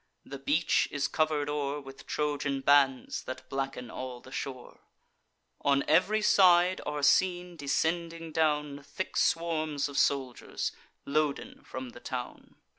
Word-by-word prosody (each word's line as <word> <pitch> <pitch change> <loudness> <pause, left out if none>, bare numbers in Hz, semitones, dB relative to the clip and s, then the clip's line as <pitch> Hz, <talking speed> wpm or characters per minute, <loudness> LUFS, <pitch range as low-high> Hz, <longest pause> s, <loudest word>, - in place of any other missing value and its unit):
The 140 0 -8
beach 145 +5 +2
is 140 -1 -1
cover'd 155 -2 0
o'er 145 -1 -2
With 135 -1 -12
Trojan 145 -2 -1
bands, 135 -2 +3
that 130 0 -7
blacken 135 -2 -4
all 130 -1 -6
the 130 - -15
shore: 130 -2 -6 0.8
On 140 -1 +3
ev'ry 195 +7 +3
side 180 -2 +5
are 150 -1 -3
seen, 180 +2 +3
descending 165 +2 -1
down, 150 -2 0
Thick 140 +7 -6
swarms 155 -4 +1
of 140 - -2
soldiers, 130 -3 -1 0.3
loaden 150 0 -1
from 130 -1 -7
the 120 - -12
town. 125 0 -7
145 Hz, 130 wpm, -30 LUFS, 135-160 Hz, 0.8 s, side